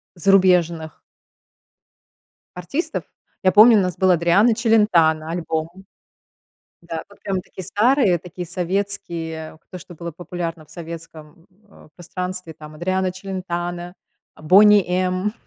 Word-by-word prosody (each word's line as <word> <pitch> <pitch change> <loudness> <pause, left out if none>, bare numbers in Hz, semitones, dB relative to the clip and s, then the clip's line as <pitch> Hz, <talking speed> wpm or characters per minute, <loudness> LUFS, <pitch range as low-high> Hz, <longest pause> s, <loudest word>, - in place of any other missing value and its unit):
зарубежных 175 -3 +2 1.6
артистов. 275 - -3 0.4
Я 185 - +4
помню 220 +3 +7
у 200 - +4
нас 180 -1 -2
был 185 -1 +3
Адриано 175 +7 +4
Челентано 180 -9 +3
альбом. 160 -2 -3 1.1
Да. 170 -1 -6
Вот 200 - -19
прям 190 -2 -2
такие 185 0 -10
старые, 215 - +2
такие 180 +1 -8
советские, 170 -3 -4
то 185 - -8
что 175 +1 -13
было 170 0 -7
популярно 170 -1 -6
в - - -24
советском, 165 -1 -10 0.2
э, - - -18
пространстве, 180 -1 -5
там 155 0 -12
Адриано 185 +3 -1
Челентано, 175 -2 -5 0.5
"Бони 200 +5 +6
М"- 185 +2 0
180 Hz, 115 wpm, -21 LUFS, 165-190 Hz, 1.6 s, помню